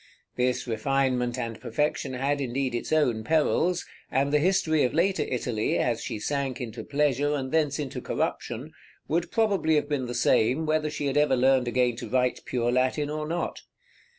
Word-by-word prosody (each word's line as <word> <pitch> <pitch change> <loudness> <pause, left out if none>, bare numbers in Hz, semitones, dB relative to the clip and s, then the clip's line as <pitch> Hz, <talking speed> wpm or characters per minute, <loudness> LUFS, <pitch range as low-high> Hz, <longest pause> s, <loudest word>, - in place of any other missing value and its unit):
This 125 0 0
refinement 125 +1 0
and 115 -2 -4
perfection 135 +1 -1
had 140 +3 0
indeed 130 0 -1
its 120 - -3
own 125 -8 +2
perils, 160 +5 +1 0.2
and 140 +2 +1
the 150 - +5
history 165 -2 +2
of 125 - 0
later 190 +3 +2
Italy, 120 -3 -1
as 115 -2 0
she - - -4
sank 135 +3 -2
into 120 -2 -6
pleasure 145 0 +1
and 130 -2 -3
thence 150 -3 +1
into 145 -4 -4
corruption, - - -3 0.4
would 170 +2 0
probably 200 -8 +2
have 150 -1 +1
been 140 -4 -1
the 120 - -4
same 130 +8 +2
whether 155 0 +1
she 150 -1 -4
had 140 0 0
ever 145 -2 +4
learned 130 0 +3
again 120 -1 +1
to - - -6
write 125 -1 +1
pure 120 -1 0
Latin 130 +4 +1
or 150 0 -3
not. 170 +2 -3
135 Hz, 180 wpm, -27 LUFS, 125-150 Hz, 0.4 s, the